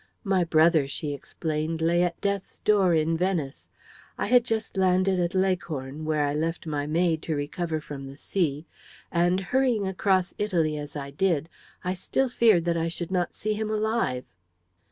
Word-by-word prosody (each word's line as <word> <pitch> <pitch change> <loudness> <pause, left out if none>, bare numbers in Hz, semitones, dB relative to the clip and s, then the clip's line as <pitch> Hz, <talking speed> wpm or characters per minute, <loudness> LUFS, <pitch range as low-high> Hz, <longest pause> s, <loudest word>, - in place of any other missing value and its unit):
"My 195 -4 +2
brother," 160 -3 +4
she 145 +1 -4
explained, 155 +2 -3
"lay 170 +2 +2
at 175 -1 0
death's 200 -1 -2
door 195 -5 +3
in 160 +1 +2
Venice. 165 -6 -2 0.5
I - - -1
had 245 +2 +5
just 225 -3 -2
landed 185 0 +3
at 175 +2 -1
Leghorn, 155 -6 -1
where 155 -1 +1
I 145 - -1
left 165 +3 -2
my 145 -2 -2
maid 165 0 +1
to 160 - -2
recover 155 +3 -2
from 140 -2 -8
the 135 - -9
sea, 150 -1 -1 0.5
and 175 +2 +2
hurrying 240 +1 +1
across 190 0 +1
Italy 170 -7 +1
as 145 0 -7
I 140 -1 -5
did, 165 0 0 0.3
I 180 0 -1
still 255 +8 -1
feared 220 -8 +4
that 170 -1 +1
I 165 0 0
should 170 +1 -5
not 180 -2 0
see 215 +1 -1
him 215 0 -3
alive." 215 - 0
170 Hz, 175 wpm, -26 LUFS, 155-190 Hz, 0.5 s, had